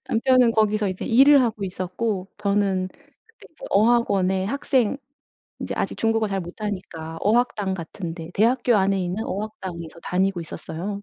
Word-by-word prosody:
남편은 250 +1 +4
거기서 215 -1 +2
이제 185 -1 -4
일을 275 +4 +6
하고 220 -4 -1
있었고 185 +2 -3
저는 200 -2 +1 0.4
그때 455 +2 -19
이제 - - -12
어학원에 195 -4 +3
학생 260 +1 +1 0.6
이제 - - -4
아직 - - -2
중국어 225 -1 +1
잘 195 -1 -2
못하니까 175 -4 -6
어학당 210 -3 +1
같은 170 0 -6
데 165 -1 -8
대학교 240 +2 +3
안에 195 0 +2
있는 180 +5 -3
어학당에서 185 -5 -6
다니고 190 0 0
있었어요. 175 +5 -6
200 Hz, 350 characters per minute, -23 LUFS, 185-225 Hz, 0.6 s, 일을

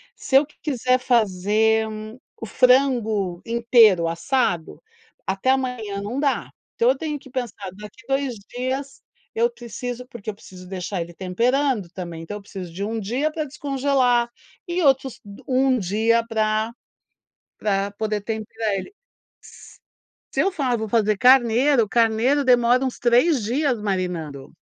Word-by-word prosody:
se 265 - -3
eu 275 - +7
q 300 - -24
quiser 255 -3 +1
fazer 220 -1 +2 0.5
o - - -4
frango 225 -7 +2
inteiro 230 -6 +4
assado, 175 -1 -1 0.4
até 195 +7 +1
amanhã 245 -7 -2
não 235 +7 -4
dá. 275 -4 0 0.2
Então, 235 - +3
eu 265 - +2
tenho 300 0 -3
que 265 - -15
pensar, 235 -7 -5
daqui 210 +4 -12
2 270 -3 0 0.2
dias 265 +2 -3 0.3
eu 470 +1 +2
preciso 245 - -7
porque 235 -5 -8
eu 210 - -5
preciso 185 -3 -13
deixar 185 0 -4
ele 170 +1 -7
temperando, 235 +4 0
também, 170 -3 -7
então 205 +5 -6
eu 210 - -11
preciso 190 -3 -8
de 190 +4 -4
1 225 +2 -2
dia 255 +10 -1
pra 310 -1 -3
descongelar, 270 -4 +1 0.4
e 350 +1 -1
outros, 270 -3 +2
d 200 0 -12
1 260 -1 +2
dia 225 +4 +1
pra 220 0 0 0.9
pra 200 -1 0
poder 215 0 -2
temperar 220 0 -3
ele 195 - -5 1.4
Se - - -2
eu 390 - +2
falo: 275 -8 -1
"Eu 240 - +1
vou 220 0 -4
fazer 215 -1 +2
carneiro", 250 +1 +4
carneiro 235 +6 +2
demora 245 0 +4
uns 260 -2 -2
3 245 +3 +3
dias 255 +2 0
marinando. 180 -9 -3
230 Hz, 150 wpm, -23 LUFS, 205-260 Hz, 1.4 s, eu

